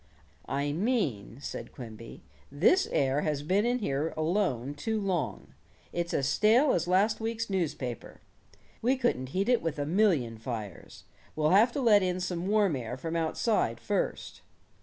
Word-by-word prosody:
"I 140 +1 -1
mean," 155 - -1
said - - -6
Quimby, 115 -3 -10 0.3
"this 190 - +3
air 135 +1 +1
has 150 -2 -1
been 195 +8 +2
in 245 +1 +1
here 155 - -2
alone 155 - 0
too 220 +9 -2
long. 180 - -3 0.4
It's 170 0 -2
as 135 - 0
stale 225 - +4
as 170 0 0
last 195 +4 +2
week's 225 -1 -3
newspaper. 150 - -3 0.6
We 255 +4 +2
couldn't 240 - 0
heat 190 +7 -1
it 245 -2 +3
with 160 -2 -3
a 145 - -1
million 155 - +1
fires. 110 -5 -7 0.3
We'll 155 0 +2
have 215 +6 +5
to 285 - -2
let 215 -5 +5
in 185 -1 -1
some 180 -1 -3
warm 205 -5 +3
air 125 -1 -5
from 165 +4 -4
outside 165 +7 0
first." - - -3
170 Hz, 160 wpm, -29 LUFS, 140-215 Hz, 0.6 s, have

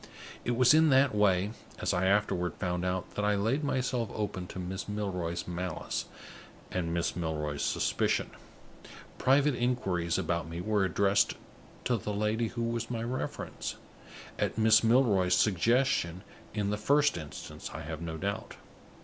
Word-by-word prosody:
It 120 - 0
was 125 +2 +6
in 160 0 +6
that 135 -1 +4
way, 100 -1 +3 0.3
as - - -1
I 95 +1 +1
afterward 95 -3 +1
found 90 -2 -2
out, 90 0 -2
that 105 - -2
I 105 0 +3
laid 115 +9 0
myself 125 -5 0
open 100 -4 -3
to - - -9
Miss 95 +2 -5
Milroy's 90 -5 -3
malice 90 -1 -3 0.7
and 85 -2 -1
Miss 85 0 -1
Milroy's 75 -4 -2
suspicion. - - 0 0.9
Private 140 +2 +4
inquiries 95 -9 0
about 85 -3 -1
me 85 +1 -5
were 100 +1 +1
addressed 100 +1 +2 0.5
to 125 -1 +2
the 105 0 -4
lady 110 +2 0
who 120 +1 -4
was 115 0 -2
my 115 -2 -2
reference 125 +2 -4 0.6
at - - -1
Miss 110 0 +5
Milroy's 110 -7 +4
suggestion, 105 -2 +2 0.3
in 105 -2 -1
the 105 - 0
first 145 +6 +3
instance, 75 -4 -7
I 75 - -6
have 80 +1 -6
no 80 -1 -4
doubt. 100 +5 -4
100 Hz, 150 wpm, -30 LUFS, 90-115 Hz, 0.9 s, was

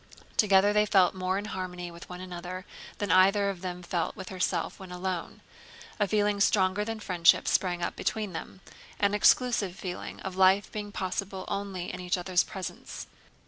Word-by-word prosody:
Together 200 -1 +5
they 210 0 +4
felt 190 -3 +4
more 185 0 -1
in 205 - -3
harmony 180 -3 -5
with 170 0 -12
one 180 0 -7
another 180 0 -7 0.3
than 205 -4 -1
either 195 +2 +5
of 180 -3 -10
them 180 -1 -5
felt 175 -1 -2
with 190 - -8
herself 185 -1 -1
when 190 -2 -10
alone. 180 -1 -4 0.6
A 205 - +2
feeling 205 0 +1
stronger 195 0 +3
than 225 +1 -4
friendship 180 -5 +3
sprang 175 -2 +1
up - - -2
between 210 -4 -2
them; 165 +3 -7 0.4
an 200 0 +2
exclusive 210 -3 +3
feeling 185 -3 -6
of 190 -1 -5
life 190 +1 +4
being 210 -1 -5
possible 190 0 -3
only 195 -3 -4
in - - -6
each 180 0 -1
other's 180 0 +2
presence. 190 -3 -7
185 Hz, 175 wpm, -29 LUFS, 180-200 Hz, 0.6 s, Together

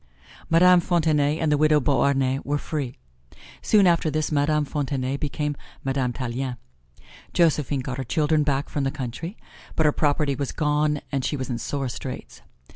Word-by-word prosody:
Madame 180 +2 +6
Fontenay 155 -4 +1
and 160 -2 0
the 145 - +2
widow 155 0 +4
Beauharnais 135 -1 +1
were 145 +1 -1
free. 145 -4 -4 0.6
Soon 205 -3 +4
after 170 -2 +3
this 155 +1 -1
Madame 150 +1 +2
Fontenay 135 -2 -2
became 150 +1 -2 0.3
Madame 135 -2 0
Tallien. 125 +1 -4 0.8
Josephine 150 -5 +2
got 130 0 -5
her - - -2
children 155 +3 +1
back 145 -1 0
from 145 - -2
the 135 - +1
country, 140 - -6 0.4
but 160 - +2
her 150 - +5
property 145 -1 +1
was 135 0 -3
gone 150 -1 +1
and 135 -2 -1
she 145 - -1
was 130 -1 -4
in 120 - -2
sore 140 0 -3
straits. 120 - -7
145 Hz, 165 wpm, -24 LUFS, 135-155 Hz, 0.8 s, Madame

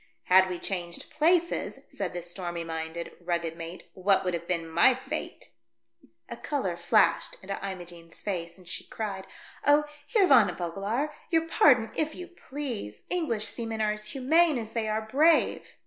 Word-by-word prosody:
"Had 185 +1 +5
we 180 - -3
changed 175 -2 -4
places," 340 +3 +1
said - - -4
the 175 - -4
stormy 175 -1 -5
minded, 165 +1 -5
rugged 170 -2 -1
mate, 165 +1 -8
" - - -45
what 195 +1 +2
would 180 -1 -1
have 170 0 -4
been 170 -2 -1
my 160 - +5
fate - - -6 0.4
?" 115 - -55 0.3
A - - -6
colour 235 - -2
flashed 170 - +2
into 195 +1 -4
Imogene's 175 -2 -10
face, 170 -4 -4
and 185 -2 -17
she - - -5
cried, 195 -3 -5 0.4
"Oh, 290 +1 +5 0.2
Heer 430 -5 +4
Van 250 - +6
Vogelaar, 200 - -2 0.2
your 325 -1 +2
pardon, 250 -8 +4
if 310 0 0
you 360 - -7
please. 265 - -6
English 300 -12 0
seamen 225 -1 -4
are 215 -1 +2
as 210 0 -6
humane 300 +5 +3
as 225 -2 -5
they 225 -2 -1
are 215 +1 -1
brave." 300 +8 +2
205 Hz, 170 wpm, -28 LUFS, 175-280 Hz, 0.4 s, Van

